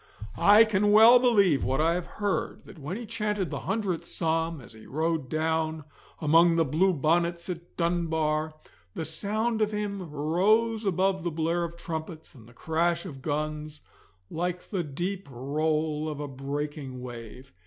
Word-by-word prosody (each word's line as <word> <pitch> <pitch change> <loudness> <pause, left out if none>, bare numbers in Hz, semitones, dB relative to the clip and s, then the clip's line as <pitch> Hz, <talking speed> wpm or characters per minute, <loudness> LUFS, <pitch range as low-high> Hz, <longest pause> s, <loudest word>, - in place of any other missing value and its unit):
I 210 +2 +7
can 205 -1 +2
well 225 +4 +8
believe 200 - +3
what 135 +2 0
I 165 +2 +3
have 180 0 -3
heard, 205 -2 -2
that 170 - -13
when 155 +7 -5
he 235 - -6
chanted 210 -4 -2
the - - -3
Hundredth 195 -7 -1
Psalm 165 -1 -1
as 120 -2 -13
he 110 0 -14
rode 160 -2 -1
down 160 0 -1 0.4
among 165 +2 +5
the 165 -1 +3
blue 165 +7 +2
bonnets 170 +3 0
at 175 -1 -7
Dunbar, 160 -2 0 0.4
the 160 - -3
sound 215 +7 -1
of 215 - +3
him 200 -4 -4
rose 205 +9 +1
above 190 0 +1
the 175 - 0
blare 165 +2 -1
of 170 0 -6
trumpets 160 -1 -6
and 115 -3 -16
the - - -18
crash 170 +6 0
of 140 -7 -8
guns, 150 +1 -3 0.5
like 180 +2 -3
the 190 -4 0
deep 175 +4 -4
roll 150 +4 -1
of 150 -2 -6
a 145 - -4
breaking 140 0 -5
wave. 120 0 -10
165 Hz, 165 wpm, -27 LUFS, 150-190 Hz, 0.5 s, well